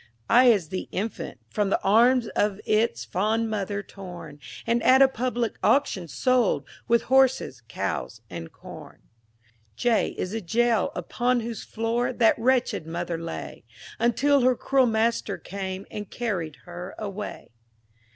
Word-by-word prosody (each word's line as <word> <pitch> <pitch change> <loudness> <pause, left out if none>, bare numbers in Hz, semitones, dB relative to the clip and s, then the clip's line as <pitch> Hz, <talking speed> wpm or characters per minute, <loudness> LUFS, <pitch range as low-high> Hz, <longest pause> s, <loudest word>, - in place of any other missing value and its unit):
I 245 +2 +7
is 205 -10 +4
the 185 - -4
Infant, 205 +3 -4
from 205 -2 0
the - - +2
arms 235 +4 +4
Of 205 -1 0
its 215 - +1
fond 215 - 0
mother 205 -1 -2
torn, 175 -8 -10 0.3
And, 235 +1 +1
at 260 +2 +6
a 270 - +8
public 245 -2 -2
auction, 235 -11 +2
sold 255 - +1 0.2
With 235 -1 +3
horses, 260 - +2
cows, 110 +1 -4
and 85 -4 -8
corn. - - -12 0.7
J 235 - +1
is 185 - -3
the 225 +1 -3
Jail, 225 +3 +1
upon 245 0 0
whose 230 -1 -5
floor 230 +2 -1
That 225 -2 +4
wretched 245 -9 +1
mother 170 0 -3
lay, 80 - -7 0.4
Until 270 +4 +3
her 255 0 +4
cruel 265 +1 +2
master 220 -2 0
came, 190 -1 -6
And 210 -2 -6
carried 180 -11 -3
her 175 +1 -8
away. 210 0 -6
220 Hz, 140 wpm, -26 LUFS, 185-240 Hz, 0.7 s, a